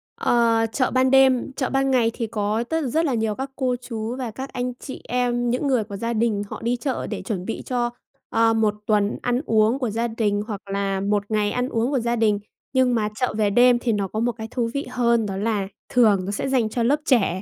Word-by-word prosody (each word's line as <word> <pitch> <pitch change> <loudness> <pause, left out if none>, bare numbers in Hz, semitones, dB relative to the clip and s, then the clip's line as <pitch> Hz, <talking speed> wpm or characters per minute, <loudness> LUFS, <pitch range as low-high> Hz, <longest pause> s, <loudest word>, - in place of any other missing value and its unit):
Ờ, 230 -1 +2
chợ 255 +2 0
ban 260 0 +3
đêm, 265 -1 +4
chợ 260 -1 -2
ban 270 0 +1
ngày 235 -3 +3
thì 230 -2 -3
có 215 +1 -1
tất 320 +7 -1
rất 320 +7 +1
là 280 - 0
nhiều 220 -2 0
các 270 +3 -5
cô 255 -2 0
chú 230 -1 -4
và 255 -3 -4
các 265 +5 -7
anh 250 0 -2
chị 265 - -8
em, 245 -1 0
những 250 +4 0
người 255 -5 +2
của 205 -1 -8
gia 230 +3 -2
đình 220 -2 +1
họ - - -7
đi 235 +2 0
chợ 255 +2 -3
để - - -4
chuẩn 185 -5 -4
bị 225 - -4
cho, 245 -2 0 0.4
ơ, 225 0 +3
1 220 -2 +2
tuần 210 -2 +2
ăn 245 +1 0
uống 220 +3 +3
của 250 -4 -1
gia 230 +3 -1
đình 215 -3 0
hoặc 205 -4 -5
là 195 -1 -1
1 205 +1 +1
ngày 210 -1 +1
ăn 250 +1 -1
uống 230 +2 0
của 270 - +1
gia 235 +1 0
đình, 215 -3 +2 0.3
nhưng 260 -2 +3
mà 210 -2 0
chợ 250 0 -1
về 210 -2 +2
đêm 245 +3 +5
thì 240 -1 0
nó 205 -2 0
có 215 - -4
một 240 +2 +1
cái 220 -1 -7
thú 235 -2 -1
vị 280 - -2
hơn, 235 -2 +2
đó 195 -2 -4
là 205 -1 -1 0.2
thường 210 -7 +4
nó 200 - -3
sẽ 205 - -2
dành 250 -5 +2
cho 235 +2 -1
lớp 280 +6 +2
trẻ 195 - +2
235 Hz, 250 wpm, -23 LUFS, 215-250 Hz, 0.4 s, đêm